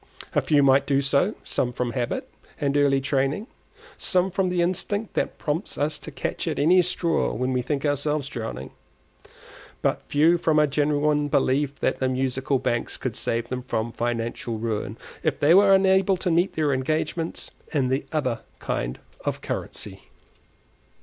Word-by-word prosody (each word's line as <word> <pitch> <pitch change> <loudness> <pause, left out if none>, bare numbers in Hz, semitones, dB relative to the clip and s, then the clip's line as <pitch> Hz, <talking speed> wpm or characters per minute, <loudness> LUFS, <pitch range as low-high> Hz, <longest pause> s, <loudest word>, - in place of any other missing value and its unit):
A - - +3
few 145 -2 +3
might 135 0 +4
do 140 -1 +3
so, 140 +9 +1
some 125 - -1
from 125 -1 -2
habit 120 -2 -2 0.3
and 140 -1 0
early 140 -1 +4
training, 135 +7 0 0.5
some 185 0 +2
from 185 0 +1
the 180 -1 +1
instinct 205 +4 -1
that - - -1
prompts 160 +4 -3
us 150 +2 0
to - - -8
catch - - -3
at - - -1
any 180 +5 +5
straw 170 -1 0
when 130 +3 -1
we 125 - +1
think 140 +3 -2
ourselves 145 0 0
drowning, 110 - -6 1.1
but - - +1
few 165 +4 +4
from 160 -2 +2
a 150 - +6
genuine 150 +1 +1
belief 140 0 +1
that - - 0
the 130 - +1
Musical 130 +1 0
Banks 120 -2 -1
could - - -4
save 115 +1 -2
them 125 0 -3
from 115 -2 -2
financial 115 0 -2
ruin, 110 -1 -3 0.2
if - - 0
they 150 +3 +5
were 195 +1 +7
unable 190 0 +4
to 180 0 -1
meet 175 +3 +2
their 150 -3 +1
engagements 155 +5 -2 0.2
in 135 -4 +1
the 135 +2 0
other 130 -7 0 0.2
kind - - -3 0.3
of - - -2
currency. 95 -2 -5
145 Hz, 165 wpm, -25 LUFS, 130-165 Hz, 1.1 s, were